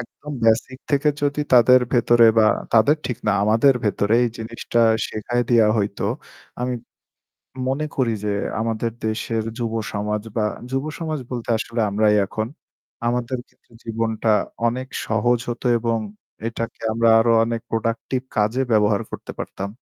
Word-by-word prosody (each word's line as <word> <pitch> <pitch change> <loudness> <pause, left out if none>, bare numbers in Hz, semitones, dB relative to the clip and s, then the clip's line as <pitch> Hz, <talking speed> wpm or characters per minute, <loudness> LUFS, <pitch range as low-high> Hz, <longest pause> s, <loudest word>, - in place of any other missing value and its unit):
একদম 145 +5 -9
বেসিক 115 +3 +2
থেকে 145 +1 +2
যদি 145 +1 0
তাদের 125 +1 +7
ভেতরে 120 -1 +5
বা 110 - +6 0.3
তাদের 120 +7 +5
ঠিক 125 - -3
না, 105 - +4
আমাদের 115 +6 +4
ভেতরে 105 +1 +1
এই 120 - +1
জিনিসটা 115 +1 -2 0.3
শেখায় 120 +3 -1
দেওয়া 115 -3 +5
হইত। 100 0 -2 0.6
আমি 125 0 -1 0.9
মনে 140 +4 -1
করি 125 -4 +1
যে 105 - 0 0.3
আমাদের 115 +1 -1 0.2
দেশের 110 0 -1 0.2
যুব 115 -2 -2 0.2
সমাজ 105 0 -2
বা 110 - +2 0.3
যুব 135 +2 -1
সমাজ 155 -4 -3
বলতে 120 -2 -4
আসলে 115 +1 -3
আমরাই 105 +1 +3
এখন। 110 +3 -3 0.6
আমাদের 125 +1 -1
ক্ষেত্রে - - -32
জীবনটা 115 0 -2 0.4
অনেক 130 +3 -2 0.2
সহজ 115 +2 +2
হত 120 -1 -4 0.2
এবং 115 0 0 0.5
এটাকে 115 0 -5
আমরা 115 +1 +2
আরো 115 +1 +3
অনেক 115 0 -2
প্রোডাক্টিভ 115 +3 -1 0.2
কাজে 110 +4 +1
ব্যবহার 105 -1 +3
করতে - - -7
পারতাম। 100 +1 -5
115 Hz, 145 wpm, -22 LUFS, 110-125 Hz, 0.9 s, তাদের